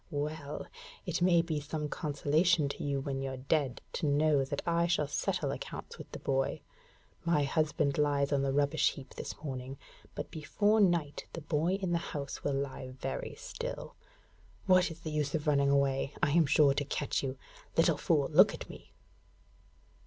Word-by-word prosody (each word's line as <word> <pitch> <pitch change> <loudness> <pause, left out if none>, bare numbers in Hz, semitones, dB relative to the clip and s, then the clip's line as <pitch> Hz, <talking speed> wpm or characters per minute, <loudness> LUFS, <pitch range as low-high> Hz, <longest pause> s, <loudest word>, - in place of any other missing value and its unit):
'Well! 150 -1 -4 0.4
It 175 -1 -2
may 175 -2 +5
be 160 -3 -2
some 150 +1 -3
consolation 150 +1 +2
to - - -5
you 140 -1 0
when 135 -1 -3
you're 135 -1 -3
dead 135 -1 0
to 155 - -1
know 145 0 +3
that 140 +1 -4
I 170 0 +2
shall 165 -4 +1
settle 145 - -1
accounts - - -7
with - - -10
the - - -6
boy. 135 0 -1 0.6
My 170 -4 +2
husband 145 -1 +1
lies 145 -1 +2
on 140 - +2
the 135 0 +1
rubbish 140 +1 +2
heap 135 -1 -11
this - - -6
morning, 130 -2 -5 0.4
but - - -5
before 205 +8 +2
night 170 -6 +1
the 165 - -5
boy 155 +3 0
in 190 -3 -2
the 170 - +2
house 145 -4 -5
will 145 - 0
lie 135 -1 -3
very 135 - -5
still. - - -6 0.7
What 185 -2 +5
is 165 0 -10
the 155 - -5
use 150 -1 -1
of 150 - -2
running 140 -2 +3
away? 140 0 +1
I 145 - +4
am 165 -1 +4
sure 140 0 +5
to 145 - -1
catch 145 0 -1
you. 135 -1 -3 0.4
Little - - +4
fool, - - +2
look - - +6
at - - -8
me!' - - -13
145 Hz, 180 wpm, -32 LUFS, 140-165 Hz, 0.7 s, look